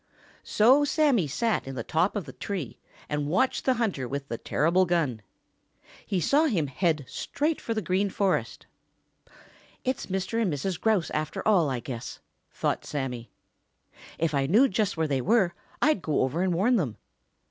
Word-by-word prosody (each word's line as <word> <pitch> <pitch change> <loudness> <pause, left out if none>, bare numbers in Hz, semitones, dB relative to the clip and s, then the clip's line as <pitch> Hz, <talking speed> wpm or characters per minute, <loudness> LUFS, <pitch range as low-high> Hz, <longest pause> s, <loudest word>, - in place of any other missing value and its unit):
So 255 +7 +4
Sammy 285 - +2
sat 220 - -1
in 135 - -5
the 115 - -3
top 170 - +1
of 200 -6 -2
the 130 - -10
tree 185 - -5 0.3
and 150 -1 -2
watched 260 +11 +1
the 260 - +3
hunter 200 - -1
with 140 +2 -4
the 115 - -4
terrible 180 +4 +2
gun. 155 -10 0 0.9
He 190 - 0
saw 285 - +3
him 195 - +1
head 150 0 0
straight 305 +2 -2
for 230 - -3
the 215 - -2
Green 190 +3 +1
Forest. 195 0 -1 1.2
"It's 260 0 -2
Mr. 190 +4 -1
and 200 -6 +1
Mrs. 170 +5 -3
Grouse 215 -7 +1
after 155 +5 -3
all, 180 -9 +4
I 130 -3 -2
guess," 120 -3 -7 0.3
thought - - -1
Sammy. 125 -5 -4 0.9
"If 160 -1 0
I 135 -1 +1
knew 225 - +5
just 205 -4 -1
where 160 -1 +1
they 135 -3 0
were 195 - +2 0.3
I'd 300 -10 +3
go 155 -3 0
over 130 +7 0
and 185 -2 +1
warn 230 +8 +3
them." 140 - -2
180 Hz, 170 wpm, -27 LUFS, 145-220 Hz, 1.2 s, knew